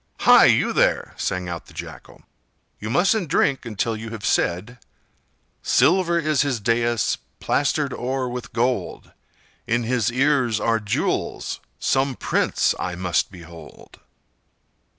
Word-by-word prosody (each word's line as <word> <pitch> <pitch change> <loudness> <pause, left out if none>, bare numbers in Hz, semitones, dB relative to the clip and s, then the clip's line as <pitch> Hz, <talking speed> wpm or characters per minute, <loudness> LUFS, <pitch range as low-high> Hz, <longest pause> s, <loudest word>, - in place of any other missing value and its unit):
"Hi! - - +7
you - - +3
there!" - - +1
sang 90 -1 -3
out 85 -1 -6
the - - -17
Jackal; - - -10 0.6
"you 105 - -5
mustn't 180 - +2
drink 135 -5 +1
until 115 +1 -2
you 110 +1 -7
have 110 -2 -7
said— 105 +9 -1 0.8
'Silver 170 0 +3
is 155 -4 +1
his 135 -5 -1
dais, 115 +1 0 0.2
plastered - - 0
o'er 130 +1 -2
with 125 0 -6
gold; 120 -5 -2 0.6
In 120 +1 +1
his 120 0 0
ears 130 -4 +2
are 115 -1 +1
jewels,—some 110 - -2
prince - - +1
I 90 - -3
must 90 -1 -1
behold! 85 -4 -13
120 Hz, 125 wpm, -22 LUFS, 100-135 Hz, 0.8 s, Hi